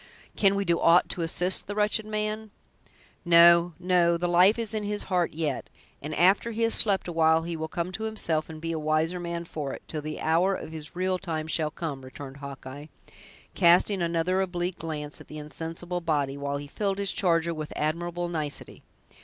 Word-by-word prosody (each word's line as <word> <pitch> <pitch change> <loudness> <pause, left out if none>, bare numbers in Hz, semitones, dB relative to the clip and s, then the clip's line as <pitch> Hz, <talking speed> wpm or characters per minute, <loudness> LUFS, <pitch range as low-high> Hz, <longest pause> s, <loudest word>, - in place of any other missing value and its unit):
"Can 200 -1 +3
we 200 0 -1
do 170 -2 +2
aught 170 +2 +5
to 175 - -3
assist 175 +3 +1
the 205 - -4
wretched 210 +1 +1
man?" 215 0 -3 0.7
"No, 170 0 +6
no! 180 -1 +2
the 175 +1 -1
life 180 +5 +5
is 230 -2 -3
in 215 - -1
his 205 0 -3
heart 180 -2 0
yet, 155 -4 -3 0.3
and 150 +1 -5
after 190 +7 +4
he 230 0 -2
has 230 - +3
slept 200 -4 +3
awhile 160 -1 +3
he 170 0 -4
will 160 0 -4
come 170 +2 -3
to 220 +4 -4
himself, 165 -8 -1
and 160 -1 -8
be 165 +1 -4
a 160 - -2
wiser 155 +3 0
man 170 0 -4
for 150 -4 -5
it, - - -9
till 155 - -4
the 155 +1 -5
hour 175 +5 +2
of 160 - -7
his 155 0 -8
real 185 0 0
time 160 -4 -3
shall 160 -1 0
come," 155 -3 -5
returned 135 +1 -9
Hawkeye, 140 +1 -9 0.7
casting 180 +3 +4
another 170 +2 +1
oblique 175 -1 -3
glance 150 -2 -5
at - - -14
the 155 - -9
insensible 165 +4 -5
body, 145 -5 0
while 140 0 -3
he 145 - -7
filled 195 +6 -2
his 200 -1 -1
charger 170 -2 +1
with 155 -1 -6
admirable 175 +3 -2
nicety. 155 -4 -5
170 Hz, 195 wpm, -27 LUFS, 155-185 Hz, 0.7 s, No